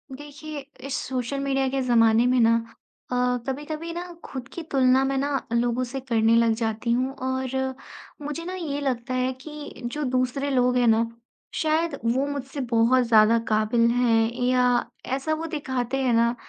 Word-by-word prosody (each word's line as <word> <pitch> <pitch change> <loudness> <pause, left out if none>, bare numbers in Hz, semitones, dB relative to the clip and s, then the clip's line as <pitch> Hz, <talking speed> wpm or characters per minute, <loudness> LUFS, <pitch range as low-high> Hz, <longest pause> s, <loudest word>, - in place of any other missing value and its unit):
देखिए, 295 +1 -8 0.3
इस 275 -1 -3
social 255 +1 -2
media 270 -1 0
के 270 0 -1
ज़माने 230 -2 +4
में 250 0 +3
ना 230 0 +5 0.6
अ, - - 0 0.3
कभी-कभी 305 +5 -4
ना, 345 - -4 0.2
खुद 260 -3 -7
की 340 - -5
तुलना, 260 -1 +4
मैं 270 0 0
ना 280 0 -1
लोगों 240 +1 +1
से 255 +2 -4
करने 230 -3 +2
लग 230 -1 +4
जाती 225 +1 -2
हूँ, 255 +3 +1
और 260 0 -2 0.5
मुझे 295 +3 -5
ना, 365 - -4
ये 315 -6 -3
लगता 255 -2 -2
है 255 0 +1
कि 300 -2 -9
जो 295 +5 -3
दूसरे 255 +3 0
लोग 250 -2 +2
हैं 245 -1 +3
ना, 225 +1 +4 0.5
शायद 315 0 0
वो 250 +4 +2
मुझसे 280 0 -5
बहुत 235 +3 +4
ज़्यादा 220 0 +6
काबिल 220 +2 +3
हैं, 230 -2 +2
या 250 -1 +3 0.3
ऐसा 295 +4 -1
वो 320 +1 -3
दिखाते 260 -3 -2
हैं 255 -2 +2
ना 235 +1 +3
255 Hz, 170 wpm, -25 LUFS, 235-280 Hz, 0.6 s, ज़्यादा